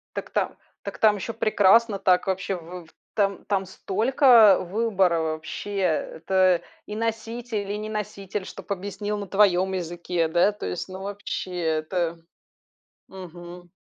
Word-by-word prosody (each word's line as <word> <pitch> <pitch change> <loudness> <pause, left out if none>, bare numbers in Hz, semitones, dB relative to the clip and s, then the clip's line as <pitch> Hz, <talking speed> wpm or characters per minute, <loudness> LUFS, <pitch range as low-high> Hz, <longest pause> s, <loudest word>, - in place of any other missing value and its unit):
Так - - -5
та - - -1 0.3
так - - -6
там 215 -1 +5
еще 205 +3 -5
прекрасно, 215 0 +4
так. 185 0 +3
Вообще. 190 +1 -1
В 175 0 -9 0.3
там 200 -2 0
там 195 -2 0
столько 220 +2 +5
выбора 190 -3 +1
вообще! 160 +6 -4
Это 180 +1 +1 0.3
и 210 - -5
носитель, 225 -1 -3
и 205 - -2
не 215 +1 -5
носитель, 205 -2 -4
чтоб - - -10
объяснил 200 +2 -3
на 200 -1 -5
твоем 190 -1 +3
языке. 175 -1 -2
Да, 175 +5 +3
то 210 - -8
есть 90 - -4
ну 185 0 -8
вообще. 200 -2 -5
Это 165 +1 -1 0.9
Мгм. 175 -1 -11
190 Hz, 140 wpm, -25 LUFS, 175-210 Hz, 0.9 s, там